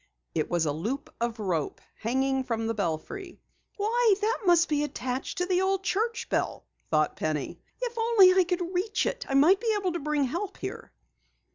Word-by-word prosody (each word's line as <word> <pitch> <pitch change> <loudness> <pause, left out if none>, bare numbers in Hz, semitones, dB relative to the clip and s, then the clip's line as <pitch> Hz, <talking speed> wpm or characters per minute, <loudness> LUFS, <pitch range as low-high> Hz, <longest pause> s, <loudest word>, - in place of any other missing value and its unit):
It - - -1
was 170 -2 +1
a 150 - +1
loop 230 - -4
of 235 -1 -1
rope, 175 -8 -2 0.2
hanging 265 +3 0
from 230 -3 -2
the 225 - 0
belfry. 215 - -4 0.4
"Why, 440 +1 +3
that 445 +3 0
must 345 -1 +5
be 295 -1 +1
attached 260 0 -4
to 360 - +1
the 365 0 +1
old 385 0 +1
church 445 +5 -1
bell!" - - -1 0.2
thought 155 -1 +2
Penny. 155 -2 -2 0.2
"If 480 -2 -3
only 450 -5 +6
I 375 0 +5
could 360 0 -2
reach 405 +4 0
it, - - -3
I 270 - 0
might 330 +8 +6
be 460 -2 0
able 375 -3 -1
to 345 - -2
bring 300 -1 0
help 350 +10 -3
here." - - -7
340 Hz, 185 wpm, -28 LUFS, 240-395 Hz, 0.4 s, only